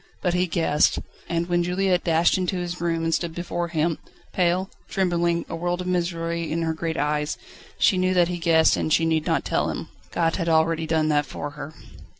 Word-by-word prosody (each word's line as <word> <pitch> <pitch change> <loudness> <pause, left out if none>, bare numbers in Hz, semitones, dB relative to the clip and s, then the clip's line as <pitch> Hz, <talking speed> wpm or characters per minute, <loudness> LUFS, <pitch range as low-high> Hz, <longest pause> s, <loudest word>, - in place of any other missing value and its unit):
But 180 -2 0
he 180 +1 +1
guessed. 160 -3 +2 0.3
And 170 0 -1
when 175 -1 +2
Juliette 180 +1 +1
dashed 165 0 +3
into 185 0 -1
his 175 -1 -4
room 165 -1 0
and 165 0 0
stood 165 -1 -1
before 175 0 -3
him, 165 -1 0 0.3
pale, 180 +1 +1 0.2
trembling, 170 -2 0
a 165 - -5
world 175 +1 -2
of 180 - -4
misery 170 -2 -1
in 165 +1 -1
her 160 -1 0
great 160 0 -3
eyes, 150 +1 -1 0.4
she 185 - +3
knew 185 0 +1
that 175 -1 +4
he 175 0 -3
guessed 160 -1 +4
and - - -1
that - - +2
she 165 - +1
need 160 -1 +1
not - - +1
tell - - 0
him. - - -5 0.2
God 165 -1 0
had 170 -3 -1
already 160 0 +2
done 155 -1 +1
that 145 -1 +2
for 145 +2 -5
her. 150 +2 -9
170 Hz, 210 wpm, -24 LUFS, 160-175 Hz, 0.4 s, that